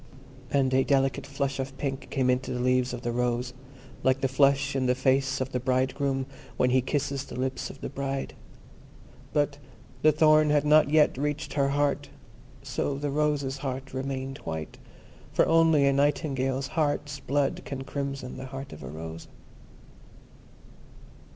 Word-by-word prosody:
And 135 -2 +2
a 130 0 +4
delicate 135 -1 +1
flush 140 -1 -2
of 135 +1 -4
pink 135 -1 -3
came 130 -2 +2
into 125 +1 -1
the 125 - -2
leaves 125 0 +2
of 125 0 -6
the 120 - -1
rose, 125 +1 -1 0.5
like 130 +1 +2
the 135 - +2
flush 140 +1 +3
in 130 -1 +1
the 125 - +3
face 135 +1 +2
of 130 +1 -2
the 125 - -1
bridegroom 130 +1 0 0.3
when 125 0 +3
he 130 0 +4
kisses 140 +1 -1
the 125 - -8
lips 130 0 -2
of 135 - -11
the - - -3
bride. 135 0 -3 1.0
But 145 -1 0 0.4
the 155 - +6
thorn 155 0 +5
had 150 0 +3
not 150 -1 +5
yet 150 -3 +4
reached 150 +1 -2
her 140 -2 +2
heart, 145 0 0 0.5
so 140 - -2
the 145 0 -2
rose's 145 -2 0
heart 135 -1 -5
remained 135 0 -4
white, 80 -1 -6 0.5
for - - +4
only 165 -3 +4
a 140 - +4
Nightingale's 135 -2 0
heart's 145 -2 -1
blood 140 0 0
can 135 -1 -5
crimson 135 -2 -4
the 130 0 -6
heart 135 +1 -7
of - - -10
a - - -7
rose. 80 +1 -7
135 Hz, 165 wpm, -27 LUFS, 130-145 Hz, 1.0 s, the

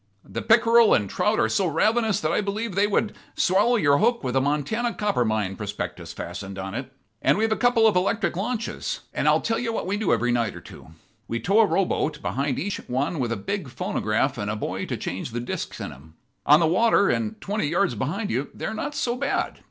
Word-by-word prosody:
The - - -5
pickerel 230 0 +5
and 105 - 0
trout 210 - 0
are - - +3
so 195 -3 +1
ravenous 215 +6 +2
that 155 - 0
I - - +1
believe 210 +2 -3
they 200 +3 +3
would 210 +1 0 0.2
swallow 205 +7 +3
your 145 -9 +3
hook 235 -1 +2
with 125 -1 -2
a 135 - +4
Montana 150 - -1
copper 205 -11 +1
mine 110 -4 -1
prospectus 105 -1 -5
fastened 95 +2 -7
on 95 0 -5
it. 130 +3 -5 0.3
And - - +3
we've 220 +1 +1
a - - +3
couple 245 -1 +3
of 220 - +4
electric 185 -1 +1
launches; 230 +4 -3
and - - -1
I'll - - +4
tell 225 - 0
you 235 -1 -2
what 225 - -3
we 195 +3 -1
do 210 -4 0
every 120 +2 +2
night 115 -3 0
or - - -7
two - - -13 0.4
we 115 - -2
tow 195 - +2
a 225 - +6
rowboat 165 -4 0
behind 140 -1 -2
each 205 +2 -2
one 140 +6 -1
with 120 -3 -1
a 115 - -1
big 175 - -4
phonograph 120 +1 -1
and 105 0 -2
a 110 - -1
boy 105 - -4
to - - -3
change 95 +6 -5
the 120 - -2
discs 120 - -5
in - - -5
'em. 80 +4 -15 0.3
On 150 +2 +7
the 170 - +3
water, 200 +4 +3
and 220 -1 -1
twenty 205 -4 -2
yards 170 -1 +1
behind 165 - -2
you, 130 +4 -1
they - - -5
are - - -2
not 285 +7 -4
so 240 -3 0
bad. 275 +2 -2
180 Hz, 230 wpm, -24 LUFS, -, 0.4 s, On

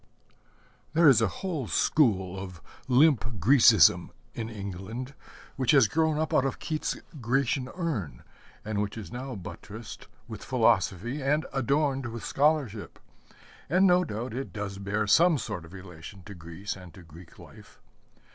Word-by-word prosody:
There 165 0 +5
is 125 -6 +6
a 110 - +3
whole 155 - -4
school 95 - +1
of 90 -3 -8 0.3
limp 135 -1 +4 0.2
Grecism 110 - +5 0.2
in 115 -1 -5
England, 105 +5 -7 0.4
which 130 0 +2
has 135 -6 +6
grown 160 +6 +1
up 155 0 -2
out - - +4
of 135 - -2
Keats's 155 -2 -4 0.2
Grecian 130 +2 0
Urn, 155 - -4 0.4
and 105 -1 -2
which 105 +2 -4
is 100 -7 -8
now 130 +1 -6
buttressed 105 +3 -9 0.2
with - - -8
philosophy 120 - +1
and 150 +3 +1
adorned 135 0 0
with 115 -2 -7
scholarship; 140 -8 0 0.7
and 185 +5 +4
no 180 -1 +5
doubt 120 -4 -5
it 135 +3 -5
does 100 -2 -6
bear 105 +2 -1
some 160 - +4
sort 90 -9 -5
of 80 - -15
relation 90 0 -11
to 100 - -10
Greece 85 +3 -7
and 90 -2 -12
to 90 - -13
Greek 80 +1 -15
life. - - -16
115 Hz, 150 wpm, -27 LUFS, 100-140 Hz, 0.7 s, is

